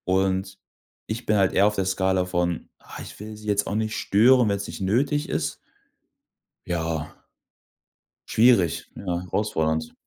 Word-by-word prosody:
Und, 95 +1 0 0.5
ich 115 +3 -4
bin 110 - +2
halt 95 -2 +3
eher 100 +2 +5
auf 105 - 0
der 95 - 0
Skala 95 0 +1
von, 90 -2 -2
ah: - - -10
„Ich - - -10
will 110 +1 -8
sie 105 0 -12
jetzt 100 -1 +1
auch 100 - -2
nicht 110 0 -1
stören, 120 +4 +4
wenn's 100 0 -2
nicht 80 +2 -8
nötig 135 +10 +1
ist.“ - - -2 1.1
Ja. 80 -2 -3 1.1
Schwierig, 105 -9 +3
ja, - - -9 0.3
herausfordernd. 80 -6 -1
95 Hz, 150 wpm, -24 LUFS, 90-110 Hz, 1.1 s, eher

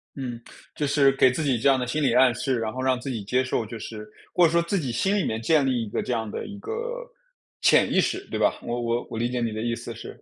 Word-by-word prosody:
嗯， 125 -4 -5 0.3
就 150 - -1
是 140 -1 +4
给 130 -2 +5
自 160 - -3
己 130 -4 +2
这 140 - +3
样 135 -1 +4
的 125 - -2
心 150 +4 -1
理 130 -4 +3
暗 125 -1 +5
示， 130 -2 -1
然 110 -1 -3
后 130 - -4
让 130 -1 +1
自 135 - -6
己 115 -5 -4
接 125 +6 +1
受 125 -3 -1
就 110 +1 -8
是 105 -1 -8 0.2
或 175 -1 +5
者 160 - +3
说 170 0 +3
自 170 +4 -1
己 140 -9 -2
心 190 - +1
里 200 - +1
面 110 0 -2
建 145 +4 +3
立 125 -3 +1
一 - - -8
个 - - -2
这 - - -4
样 110 -3 -1
的 - - -5
一 205 -1 -8
个 485 - -5 0.5
潜 - - +4
意 - - +4
识， - - -2
对 - - -3
吧？ - - +1
我 120 0 -3
我 120 +1 -1
我 115 - -4
理 120 +1 0
解 125 - -2
你 115 -2 -1
的 110 - -4
意 120 0 -1
思 - - -6
是 - - -10
125 Hz, 315 characters per minute, -25 LUFS, 115-145 Hz, 0.5 s, 给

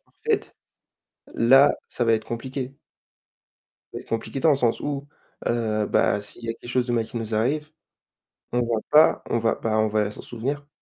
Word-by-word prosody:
parfaite. - - -3 0.8
Là, 135 +5 +6 0.2
ça 120 - -1
va 115 - +3
être 110 - -2
compliqué. 130 +2 -5 1.2
Ça - - -7
va - - -9
être - - -25
compliqué 115 +4 -3
dans 160 - +5
le 145 - +4
sens 120 -4 +1
où, 140 -1 -3 0.4
heu, 110 -3 0
bah 105 - +2
s'il 105 +3 -11
y 115 - -2
a - - -1
quelque 120 - -13
chose 125 0 +1
de 120 - -1
mal 115 -2 +1
qui - - -9
nous 115 -1 -3
arrive, 150 +8 0 0.8
on 120 - +2
va 115 -2 0
pas 150 +1 +6
on 115 - +2
va 115 0 +1
ben, 110 -1 -1
on 110 - +3
va 105 -1 0
s'en - - -9
souvenir. 140 +5 -4
120 Hz, 200 wpm, -24 LUFS, 110-135 Hz, 1.2 s, Là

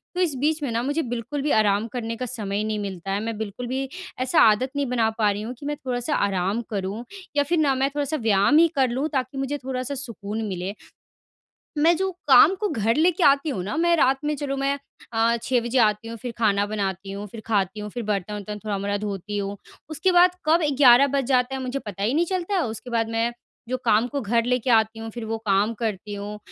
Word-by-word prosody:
तो 365 - 0
इस 330 -6 +1
बीच 305 +3 +1
में 280 - -1
ना 230 +1 0
मुझे 290 +5 0
बिल्कुल 245 +4 -4
भी 290 +1 0
आराम 210 0 +3
करने 230 -2 -3
का 255 - -4
समय 215 -5 -4
ही 210 - 0
नहीं 215 -1 -2
मिलता 195 -2 -5
है, 200 - 0
मैं 225 -1 -3
बिल्कुल 220 +3 -5
भी 265 +2 -2 0.3
ऐसा 255 0 +3
आदत 225 +4 +4
नहीं 285 0 0
बना 235 -3 +2
पा 215 -2 +3
रही 205 +1 -4
हूँ 225 +3 -5
कि 285 - -9
मैं 295 +1 -2
थोड़ा-सा 250 +3 -1
आराम 195 +2 0
करूँ 200 +2 -3 0.3
या 285 - +5
फिर 335 +5 0
ना 285 -3 +3
मैं 270 +1 +1
थोड़ा-सा 295 +1 -1
व्यायाम 220 +3 +3
ही 335 +1 +7
कर 265 -2 +3
लूँ, 260 +5 -1
ताकि 265 -2 -2
मुझे 270 +2 -2
थोड़ा-सा 260 +1 -3
सुकून 225 -5 -5
मिले। 190 +1 -4 1.0
मैं 325 +4 +5
जो 385 0 0 0.2
काम 280 +6 +8
को 420 +2 -1
घर 230 -5 +1
लेके 345 +3 +2
आती 280 +2 +4
हूँ 195 -10 -3
ना, 205 +10 -4
मैं 340 +1 +3
रात 270 -2 +3
में 300 0 0
चलो 275 -1 -3
मैं 275 +1 0 0.4
अ, 230 +1 +2
6 255 -1 +2
बजे 240 +2 -1
आती 215 0 +2
हूँ, 230 - -6
फिर 245 +2 -6
खाना 205 -3 +2
बनाती 195 -2 -3
हूँ 200 +1 -5
फिर 220 +2 -10
खाती 205 -2 0
हूँ, 210 0 -5
फिर 240 +3 -5
बर्तन-वर्तन 210 0 -3
थोड़ा-मोड़ा 200 -1 -1
धोती 205 0 -4
हूँ। 200 0 -3 0.3
उसके 315 +4 +1
बाद 355 0 +5
कब 325 +3 +4 0.2
11 265 0 +7
बज 275 - +2
जाता 255 0 +2
है 265 - -4
मुझे 260 +1 -3
पता 200 -5 -6
ही 225 +5 +1
नहीं 330 +4 +2
चलता 370 +2 -2
है, 370 - +2
उसके 225 +3 -7
बाद 225 -1 0
मैं 230 +1 0 0.4
जो 255 - 0
काम 225 +1 +3
को 280 +2 -3
घर 230 +1 +1
लेके 250 0 0
आती 220 -1 +3
हूँ, 225 0 -6
फिर 235 0 -6
वो 225 +1 -2
काम 205 +2 +2
करती 210 -2 -4
हूँ, 205 +1 -6
235 Hz, 235 wpm, -24 LUFS, 210-275 Hz, 1.0 s, काम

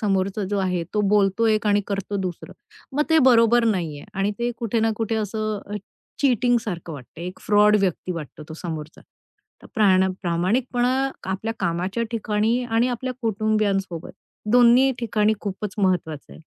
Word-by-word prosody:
समोरचा 195 -1 0
जो 205 - 0
आहे, 180 -2 0
तो 210 - +2
बोलतो 205 +2 +3
एक 215 -1 +2
आणि 205 0 +3
करतो 200 0 -3
दुसरं. 185 -3 -5 0.4
मग 300 - +4
ते 320 - +6
बरोबर 230 0 +5
नाहीये. 170 -10 -1
आणि 195 +1 0
ते 240 0 0
कुठे 230 -1 -1
ना 225 0 +2
कुठे 225 0 -1
असं 215 -1 -3 0.4
चीटिंगसारखं 235 - +1
वाटतंय, 150 +4 -10
एक 180 +1 -7
फ्रॉड 210 0 +5
व्यक्ती 185 -1 -1
वाटतो 155 -2 -8
तो 160 - -7
समोरचा. 160 -2 -6 0.7
प्राणा 190 -3 +4
प्रामाणिकपणा 235 +9 0 0.4
आपल्या 205 +4 -2
कामाच्या 180 +6 -1
ठिकाणी 225 +2 0
आणि 235 +1 +1
आपल्या 255 +1 -3
कुटुंबियांसोबत 205 -5 -1 0.4
दोन्ही 245 +2 +6
ठिकाणी 215 -2 +1
खूपच 200 0 -5
महत्वाचं 175 -6 -1
आहे. - - -13
210 Hz, 145 wpm, -23 LUFS, 185-230 Hz, 0.7 s, ते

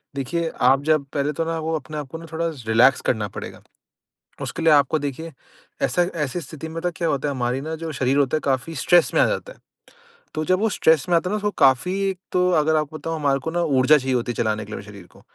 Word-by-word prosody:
देखिए 165 +5 -2
आप 135 +2 +4
जब 155 -2 +2
पहले 145 0 0
तो 165 - -1
ना 165 0 -2
वो 160 +1 -2
अपने 155 0 -6
आप 150 -2 -5
को - - -5
ना 165 - -10
थोड़ा 165 +1 -1 0.2
रिलैक्स 120 +4 +4
करना 110 -3 0
पड़ेगा, 95 - -9 0.8
उसके 165 - -4
लिए 165 - +5
आपको 145 +1 +4
देखिए 150 +3 -5 0.5
ऐसा 175 - +2 0.2
ऐसी 145 +6 -4
स्थिति 155 +1 -8
में 165 +1 -5
तो 180 - 0
क्या 170 -2 -1
होता 145 -1 -1
है, 140 - -2
हमारी 125 0 -1
ना 160 +3 -4
जो 165 0 -6
शरीर 130 -1 0
होता 145 +1 +2
है - - -1
काफ़ी 135 +4 -1
स्ट्रेस 175 +5 +3
में - - +4
आ - - +5
जाता - - -3
है। - - -23 0.8
तो 155 - -2
जब 185 +3 +2
वो 225 - +2
स्ट्रेस 160 -7 +2
में 175 - +2
आता 175 +2 0
है - - -2
ना - - +1
उसको 210 0 -1
काफ़ी 135 +7 +4 0.2
एक 190 - -6
तो 180 0 +2
अगर 155 0 +3
आपको 155 0 -2
बताऊँ 165 +1 -4
हमारे 140 -3 +1
को 160 - -2
ना 175 +1 -1 0.2
ऊर्जा 130 +4 +6
चाहिए 130 -1 -1
होती 120 0 -1
है - - -13
चलाने 110 -2 -1
के 105 - -12
लिए - - -5
हमें - - -12
शरीर 100 -3 -12
को। - - -18
150 Hz, 260 wpm, -22 LUFS, 130-165 Hz, 0.8 s, ऊर्जा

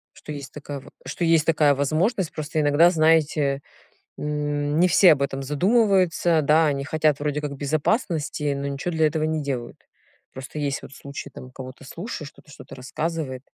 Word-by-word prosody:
Что 150 - -10
есть 140 -2 -8
такая 145 -1 -7
ва - - -14 0.2
что 145 +6 -4
есть 165 -2 +3
такая 155 -3 +3
возможность. 160 - 0
Просто 155 0 -3
иногда, 150 +4 +5
знаете, 155 -4 +2 0.6
м, 145 0 -1
не 180 - +5
все 180 +1 +7
об 140 -2 0
этом 135 0 -2
задумываются. 180 - +2
Да, 155 +3 +4
они 140 -2 -1
хотят 155 -1 +1
вроде 150 0 -1
как 150 -1 -4
безопасности, 150 - -1
но 140 0 -4
ничего 140 +5 -3
для 160 -1 +3
этого 155 0 0
не 155 -1 -1
делают. 125 -4 -4 0.5
Просто 130 +3 -8
есть 140 -2 -2
вот - - -11
случай, 140 0 -8
там 130 - -11
кого-то 130 +1 -10
слушаешь, 165 - -7
кто-то 150 - -20
что-то 135 - -12
рассказывает. 135 0 -4
150 Hz, 175 wpm, -24 LUFS, 140-160 Hz, 0.6 s, все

